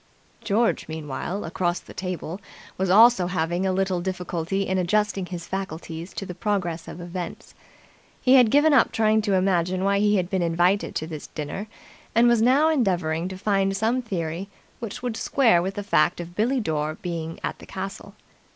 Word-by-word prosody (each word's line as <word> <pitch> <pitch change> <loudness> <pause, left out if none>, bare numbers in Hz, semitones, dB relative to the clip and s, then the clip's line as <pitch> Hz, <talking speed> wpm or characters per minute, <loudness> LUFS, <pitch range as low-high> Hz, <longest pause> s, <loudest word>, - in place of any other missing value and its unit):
George, 225 +1 +1
meanwhile, 160 +5 -4
across 175 +1 -1
the - - -14
table, 185 0 -5 0.3
was 190 0 -1
also 215 -1 +6
having 175 +1 -1
a - - +2
little 190 -1 0
difficulty 180 0 -2
in 190 -1 0
adjusting 200 +1 0
his 175 -2 -6
faculties 170 -2 -5
to 195 - -4
the 180 - -6
progress 175 -4 -2
of - - -8
events. 175 0 -7 0.7
He 255 - +4
had 250 -4 +7
given 295 +5 +5
up 280 - +4
trying 220 0 +3
to 205 -2 +1
imagine 185 -1 +1
why 200 0 +2
he 210 0 +3
had 180 -3 +1
been 190 0 -1
invited 175 +4 +1
to 155 - -2
this 155 -2 -7
dinner, 155 +7 -5 0.5
and 235 +1 +6
was 235 -2 +4
now 265 +6 +4
endeavouring 180 - +1
to 190 0 -6
find 195 -1 +1
some 230 +5 +1
theory 185 -4 -4 0.3
which 235 +2 -6
would 245 -3 -2
square 225 -5 +3
with 190 +2 -3
the 205 - -4
fact 185 -6 +2
of 175 0 -7
Billie 245 +6 +1
Dore 155 -6 -2
being 165 -2 -5
at - - -3
the - - -13
castle. 195 +2 -7
190 Hz, 180 wpm, -24 LUFS, 175-210 Hz, 0.7 s, had